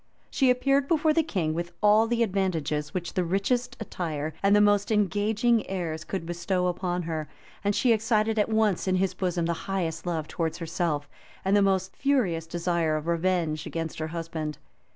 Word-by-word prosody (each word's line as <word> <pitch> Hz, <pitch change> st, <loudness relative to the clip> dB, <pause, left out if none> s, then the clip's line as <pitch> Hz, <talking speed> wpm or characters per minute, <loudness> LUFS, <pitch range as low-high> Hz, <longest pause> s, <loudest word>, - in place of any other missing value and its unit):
She 265 Hz, -2 st, +3 dB
appeared 275 Hz, +2 st, +2 dB
before 315 Hz, -1 st, +3 dB
the 325 Hz, -, +4 dB
king 185 Hz, -, -1 dB
with 170 Hz, +1 st, -4 dB
all 210 Hz, +2 st, +5 dB
the 235 Hz, 0 st, +2 dB
advantages 170 Hz, -7 st, -1 dB
which 175 Hz, -2 st, -4 dB
the 185 Hz, -, +1 dB
richest 200 Hz, +8 st, 0 dB
attire, 160 Hz, -7 st, -4 dB
and 200 Hz, +1 st, +4 dB
the -, -, +6 dB
most 205 Hz, 0 st, +3 dB
engaging 215 Hz, +3 st, +2 dB
airs, 165 Hz, -4 st, -3 dB
could 175 Hz, +1 st, -4 dB
bestow 175 Hz, +2 st, -1 dB
upon 180 Hz, 0 st, -1 dB
her, 160 Hz, -2 st, -4 dB, 0.3 s
and 205 Hz, 0 st, +1 dB
she 245 Hz, -3 st, +4 dB
excited 220 Hz, 0 st, +1 dB
at 210 Hz, -, +2 dB
once 220 Hz, -4 st, +1 dB
in 185 Hz, -, +2 dB
his 185 Hz, 0 st, +1 dB
bosom 180 Hz, -2 st, -1 dB
the 170 Hz, -, 0 dB, 0.2 s
highest 170 Hz, -3 st, -2 dB
love 160 Hz, -3 st, -2 dB
towards 165 Hz, -1 st, -2 dB
herself, 165 Hz, -3 st, -2 dB, 0.4 s
and 195 Hz, +1 st, +3 dB
the 205 Hz, -, +5 dB
most 190 Hz, -1 st, +1 dB
furious 205 Hz, -, +1 dB
desire 170 Hz, -2 st, 0 dB
of 155 Hz, -, -5 dB
revenge 170 Hz, -2 st, 0 dB
against 165 Hz, -1 st, -4 dB
her 155 Hz, -, -2 dB
husband. 160 Hz, -2 st, -4 dB
185 Hz, 180 wpm, -27 LUFS, 165-210 Hz, 0.4 s, the